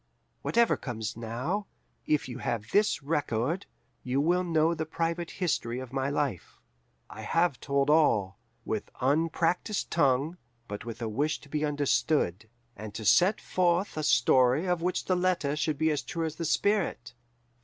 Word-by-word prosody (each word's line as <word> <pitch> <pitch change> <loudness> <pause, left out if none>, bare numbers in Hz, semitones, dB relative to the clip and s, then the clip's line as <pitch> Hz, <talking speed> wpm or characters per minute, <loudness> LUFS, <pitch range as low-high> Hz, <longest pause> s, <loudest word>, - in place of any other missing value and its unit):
"Whatever 235 0 +2
comes 110 -4 -5
now, 125 - -3 0.4
if 150 -3 +1
you 125 0 -7
have 115 -3 -3
this 205 -7 +2
record, 145 - -1 0.3
you 130 +2 -1
will 175 +5 +2
know 165 -1 +2
the 160 -1 -4
private 165 +1 -2
history 125 -9 -2
of 130 -1 -7
my 135 0 0
life.... 140 - -3 0.5
I 110 - -10
have 165 +4 +1
told 140 0 +1
all, 110 -12 +3 0.3
with 110 -2 -3
unpractised 165 - 0
tongue, 145 +2 +2 0.3
but 105 +1 -6
with 115 0 -6
a - - -1
wish 145 +8 -1
to 145 - -16
be 150 +1 -1
understood, 145 - 0 0.3
and 105 0 -8
to 110 - -5
set 185 - +5
forth 180 +1 0
a 155 - -2
story 130 +1 +4
of 180 -2 0
which 180 +1 -1
the 185 - +2
letter 180 -5 +1
should 150 -1 -1
be 160 +2 +2
as 150 - -1
true 165 -1 -3
as 155 -1 -5
the 165 - -3
spirit. 185 - 0
150 Hz, 165 wpm, -29 LUFS, 125-170 Hz, 0.5 s, set